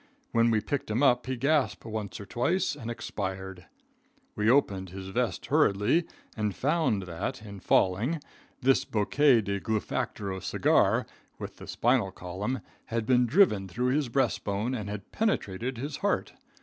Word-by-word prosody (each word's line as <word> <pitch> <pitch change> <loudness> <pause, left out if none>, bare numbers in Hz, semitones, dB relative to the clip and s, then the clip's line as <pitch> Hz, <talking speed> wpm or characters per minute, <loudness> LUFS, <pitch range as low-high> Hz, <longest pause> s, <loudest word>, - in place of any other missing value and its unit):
When 115 0 +4
we 110 -2 +2
picked 140 +3 -3
him 115 +6 +1
up 125 -2 +3
he 130 -1 -2
gasped 140 0 +1
once 110 -3 -5
or 100 - -7
twice 155 - 0
and 120 -5 -7
expired. 95 -5 -5 0.7
We 105 +1 +2
opened 100 -8 +2
his 95 +1 -7
vest 120 +4 -1
hurriedly 140 - +3 0.3
and 105 -3 -1
found 145 - +1
that, 90 +8 -4
in 100 -1 -9
falling, 105 - +2 0.4
this 135 +1 +4
bouquet 120 +4 +3
de 100 -1 -2
Gluefactoro 100 -2 -2
cigar, - - +2 0.3
with - - -7
the - - -10
spinal 120 -4 +2
column, 95 +7 -4 0.2
had 115 -1 -2
been 125 0 +4
driven 115 - +4
through 125 +7 -1
his 145 -3 0
breast 130 0 +1
bone 105 +5 -1
and 105 -5 -4
had 105 -2 -7
penetrated 125 - -1
his 140 +4 -4
heart. - - -1
115 Hz, 155 wpm, -28 LUFS, 100-130 Hz, 0.7 s, When